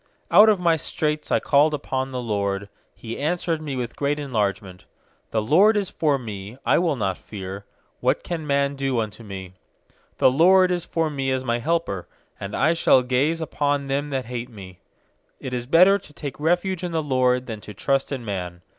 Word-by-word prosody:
fiOut 215 Hz, +1 st, +8 dB
of 210 Hz, -3 st, +3 dB
my 170 Hz, -2 st, +3 dB
straits 150 Hz, -1 st, -2 dB
I -, -, +4 dB
called 150 Hz, +2 st, +3 dB
upon 130 Hz, -2 st, -3 dB
the 130 Hz, -1 st, -4 dB
LORD; 100 Hz, -2 st, -2 dB, 0.3 s
He 115 Hz, 0 st, -7 dB
answered 165 Hz, +1 st, -1 dB
me 145 Hz, -3 st, -4 dB
with 120 Hz, -2 st, -4 dB
great 145 Hz, +1 st, 0 dB
en 145 Hz, -2 st, -6 dB
largement, 100 Hz, -4 st, -2 dB, 0.5 s
i -, -, -2 dB
6The 110 Hz, 0 st, 0 dB
LORD 205 Hz, -, +5 dB
is 200 Hz, -3 st, -2 dB
forme; 115 Hz, -8 st, -2 dB
I -, -, +4 dB
will 170 Hz, -4 st, +1 dB
not 95 Hz, -6 st, -2 dB
fear; 100 Hz, -1 st, -8 dB, 0.3 s
What -, -, +1 dB
can 165 Hz, -3 st, -4 dB
man 140 Hz, 0 st, +1 dB
do 135 Hz, -3 st, -1 dB
unto 110 Hz, 0 st, -4 dB
me? 95 Hz, -3 st, -8 dB, 0.6 s
7The 130 Hz, -, +4 dB
LORD 185 Hz, +3 st, +5 dB
is 175 Hz, -1 st, -1 dB
for 165 Hz, -2 st, -1 dB
me 135 Hz, -2 st, -2 dB
as 130 Hz, 0 st, -1 dB
my 120 Hz, -1 st, 0 dB
helper; 160 Hz, -, -1 dB, 0.3 s
And 100 Hz, +1 st, -5 dB
I 155 Hz, +4 st, +3 dB
shall 130 Hz, -6 st, +4 dB
gaze 140 Hz, +6 st, +1 dB
upon 145 Hz, -2 st, -1 dB
them 140 Hz, +2 st, -2 dB
that 135 Hz, -3 st, -2 dB
hate 120 Hz, +1 st, -5 dB
me. 95 Hz, -5 st, -12 dB, 0.6 s
8It 130 Hz, -, -6 dB
is 120 Hz, -1 st, -3 dB
better 185 Hz, +7 st, +6 dB
to 150 Hz, -, -17 dB
take 145 Hz, -1 st, -7 dB
refuge 175 Hz, +3 st, 0 dB
in 175 Hz, -1 st, -3 dB
the 160 Hz, -1 st, 0 dB
LORD 130 Hz, -2 st, +1 dB
Than 110 Hz, -3 st, -7 dB
to 105 Hz, -, -10 dB
trust 135 Hz, +6 st, 0 dB
in 130 Hz, -4 st, -4 dB
man. 90 Hz, -4 st, -5 dB
135 Hz, 200 wpm, -23 LUFS, 110-160 Hz, 0.6 s, fiOut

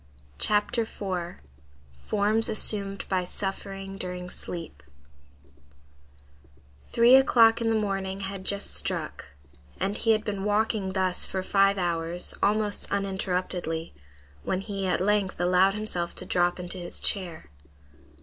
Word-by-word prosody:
CHAPTER 210 Hz, +2 st, +2 dB
IV—FORMS 175 Hz, -, -3 dB
ASSUMED 200 Hz, -2 st, +4 dB
BY 185 Hz, -1 st, 0 dB
SUFFERING 195 Hz, +1 st, -4 dB
DURING 180 Hz, 0 st, -6 dB
SLEEP 165 Hz, -, -7 dB, 2.1 s
Three 235 Hz, +2 st, +4 dB
o'clock 235 Hz, -3 st, +5 dB
in 230 Hz, -, +1 dB
the 225 Hz, -, +1 dB
morning 195 Hz, -1 st, -3 dB
had 195 Hz, -1 st, -5 dB
just 200 Hz, +1 st, +1 dB
struck, -, -, -2 dB, 0.5 s
and 195 Hz, +2 st, -1 dB
he 225 Hz, -, -2 dB
had 215 Hz, 0 st, -1 dB
been 200 Hz, -2 st, -3 dB
walking 210 Hz, -2 st, 0 dB
thus 185 Hz, -1 st, 0 dB
for 190 Hz, -1 st, -3 dB
five 195 Hz, +1 st, +3 dB
hours, 170 Hz, -1 st, -2 dB
almost 210 Hz, 0 st, +1 dB
uninterruptedly, 185 Hz, -4 st, -2 dB, 0.5 s
when 185 Hz, -, -2 dB
he 195 Hz, -2 st, -4 dB
at 180 Hz, -, 0 dB
length 200 Hz, -1 st, 0 dB
allowed 180 Hz, +2 st, +3 dB
himself 180 Hz, -5 st, -3 dB
to -, -, -3 dB
drop 175 Hz, 0 st, 0 dB
into 180 Hz, +1 st, -5 dB
his 175 Hz, -1 st, -3 dB
chair. 170 Hz, -, 0 dB
195 Hz, 120 wpm, -26 LUFS, 180-205 Hz, 2.1 s, o'clock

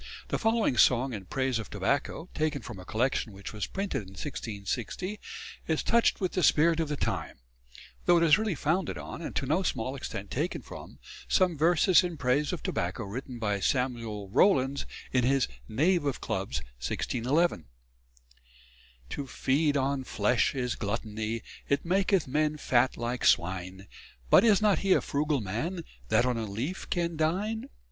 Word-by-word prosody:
The -, -, -1 dB
following 225 Hz, -, +2 dB
song 125 Hz, +2 st, +4 dB
in 100 Hz, -3 st, -6 dB
praise 130 Hz, +3 st, -1 dB
of 110 Hz, -, -7 dB
tobacco, 140 Hz, -, -1 dB
taken 155 Hz, -4 st, -1 dB
from 95 Hz, -, -8 dB
a 90 Hz, -, -10 dB
collection 115 Hz, -1 st, 0 dB
which 100 Hz, +2 st, -8 dB
was 105 Hz, -2 st, -3 dB
printed 195 Hz, -, -2 dB
in 95 Hz, -, -12 dB
1660, 120 Hz, -, -4 dB, 0.5 s
is 160 Hz, -1 st, 0 dB
touched 235 Hz, 0 st, +3 dB
with 185 Hz, -2 st, -1 dB
the 185 Hz, -, 0 dB
spirit 165 Hz, +1 st, +4 dB
of 160 Hz, -2 st, -1 dB
the 150 Hz, -, -2 dB
time; -, -, -2 dB, 0.7 s
though 175 Hz, -, +6 dB
it 170 Hz, -, +3 dB
is 155 Hz, -2 st, +7 dB
really 215 Hz, -5 st, -1 dB
founded 170 Hz, +6 st, 0 dB
on, -, -, -7 dB
and -, -, -6 dB
to -, -, 0 dB
no 155 Hz, +8 st, +1 dB
small 130 Hz, -7 st, -2 dB
extent 100 Hz, -6 st, -6 dB
taken 155 Hz, +7 st, -2 dB
from, -, -, -10 dB, 0.3 s
some 185 Hz, -3 st, +3 dB
verses 170 Hz, +4 st, +5 dB
in 175 Hz, -2 st, -3 dB
praise 140 Hz, +2 st, +1 dB
of 180 Hz, -, -5 dB
tobacco 90 Hz, +6 st, -2 dB
written 125 Hz, +5 st, -6 dB
by 105 Hz, -3 st, -1 dB
Samuel 115 Hz, -3 st, -1 dB
Rowlands 140 Hz, -, +3 dB, 0.2 s
in 125 Hz, -2 st, +2 dB
his 135 Hz, +2 st, +3 dB, 0.2 s
"Knave 170 Hz, +8 st, +2 dB
of 140 Hz, -3 st, -1 dB
Clubs," 65 Hz, +1 st, -3 dB, 0.2 s
1611: 125 Hz, -, 0 dB, 1.5 s
_To 140 Hz, -2 st, -4 dB
feed 145 Hz, +3 st, +1 dB
on 135 Hz, 0 st, 0 dB
flesh 125 Hz, +1 st, +1 dB
is 125 Hz, -2 st, -1 dB
gluttony, 110 Hz, +1 st, -3 dB, 0.3 s
It 140 Hz, -, +1 dB
maketh 190 Hz, -1 st, +2 dB
men 150 Hz, +3 st, +1 dB
fat 130 Hz, -3 st, +2 dB
like 120 Hz, +2 st, -3 dB
swine; 95 Hz, +2 st, +1 dB, 0.5 s
But -, -, +8 dB
is 215 Hz, -3 st, +4 dB
not 210 Hz, -2 st, +4 dB
he 195 Hz, -1 st, +3 dB
a -, -, +3 dB
frugal 145 Hz, -1 st, 0 dB
man 150 Hz, -, -3 dB, 0.3 s
That 110 Hz, +3 st, +4 dB
on 125 Hz, -2 st, 0 dB
a 115 Hz, -, -2 dB
leaf 125 Hz, -, -4 dB
can 170 Hz, -2 st, -1 dB
dine? 195 Hz, +8 st, -1 dB
135 Hz, 170 wpm, -29 LUFS, 115-170 Hz, 1.5 s, But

